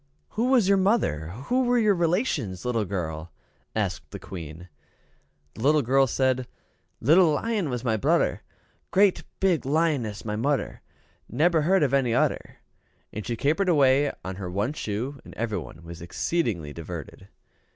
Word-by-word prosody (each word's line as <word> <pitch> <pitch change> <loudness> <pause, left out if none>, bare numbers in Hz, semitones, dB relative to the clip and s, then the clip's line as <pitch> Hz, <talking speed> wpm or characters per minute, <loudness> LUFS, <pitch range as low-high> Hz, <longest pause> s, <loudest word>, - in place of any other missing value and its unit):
"Who 230 +3 -1
was 245 -7 +4
your 200 0 +4
mother 190 - +1
who 140 - -1
were 245 0 +2
your 215 -3 +4
relations, 165 - -1
little 115 -4 0
girl?" 85 -4 -4 0.4
said - - -1
the - - -7
Queen. 85 -1 -9 0.9
The - - -10
little 150 +3 +4
girl 135 +3 +3
said, 130 0 0 0.5
"Little 160 +5 +5
lion 210 -1 -1
was 125 -2 -3
my 110 -3 +1
brudder; 100 - +1 0.5
great 195 -1 +3 0.2
big 185 -5 +2
lioness 140 -8 0
my 105 -1 -2
mudder; 135 +5 -1 0.5
neber 160 +5 +2
heard 180 +2 +3
of 140 -2 +1
any 130 -4 +2
udder." - - 0 0.6
And 105 - -6
she 120 - -1
capered 160 - +1
away 140 -2 +4
on 95 0 -5
her 95 -3 -5
one 100 +9 -1
shoe, 125 +2 -4
and - - -13
everybody 105 -8 -4
was 85 0 -10
exceedingly 85 - -2
diverted. 85 -2 -8
130 Hz, 150 wpm, -26 LUFS, 100-170 Hz, 0.9 s, Little